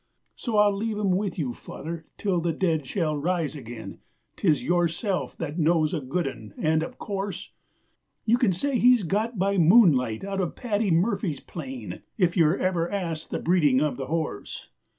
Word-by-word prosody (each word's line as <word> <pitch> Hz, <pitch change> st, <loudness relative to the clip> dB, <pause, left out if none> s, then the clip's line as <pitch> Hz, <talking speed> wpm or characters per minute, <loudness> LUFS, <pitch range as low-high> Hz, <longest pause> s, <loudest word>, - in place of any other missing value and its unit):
So 230 Hz, -4 st, -2 dB
I'll 205 Hz, -1 st, +5 dB
leave 215 Hz, +1 st, -2 dB
him 200 Hz, -3 st, +1 dB
with 190 Hz, 0 st, -1 dB
you, 135 Hz, -8 st, -2 dB
Father, 160 Hz, +5 st, -7 dB
till 190 Hz, -5 st, 0 dB
the 165 Hz, 0 st, 0 dB
dead 160 Hz, -5 st, 0 dB
shall 160 Hz, -4 st, 0 dB
rise 165 Hz, +1 st, -1 dB
again, 120 Hz, -4 st, -8 dB, 0.4 s
'Tis 155 Hz, -7 st, +2 dB
yourself 175 Hz, +3 st, 0 dB
that 160 Hz, +1 st, -4 dB
knows 160 Hz, 0 st, +2 dB
a 160 Hz, -, -1 dB
good 150 Hz, +5 st, -1 dB
'un; 110 Hz, -6 st, -8 dB
and, 155 Hz, 0 st, +2 dB
of 160 Hz, -, -6 dB
course, 195 Hz, -2 st, -4 dB, 0.7 s
You 235 Hz, +2 st, +3 dB
can 240 Hz, -7 st, +3 dB
say 250 Hz, +8 st, 0 dB
he's 245 Hz, -3 st, +5 dB
got 215 Hz, +6 st, -1 dB
by 195 Hz, +1 st, +1 dB
Moonlight 155 Hz, -, +5 dB
out 195 Hz, 0 st, -2 dB
of 175 Hz, -, -3 dB
Paddy 215 Hz, -3 st, -1 dB
Murphy's 170 Hz, -, +1 dB
plain 130 Hz, -8 st, -7 dB, 0.2 s
If 180 Hz, -5 st, +2 dB
you're 165 Hz, 0 st, +4 dB
ever 175 Hz, -2 st, 0 dB
asked 165 Hz, -6 st, -3 dB
the -, -, -2 dB
breeding 150 Hz, -7 st, +3 dB
of 150 Hz, -2 st, 0 dB
the 135 Hz, -1 st, -4 dB
horse! 160 Hz, -8 st, -4 dB
175 Hz, 175 wpm, -26 LUFS, 155-200 Hz, 0.7 s, I'll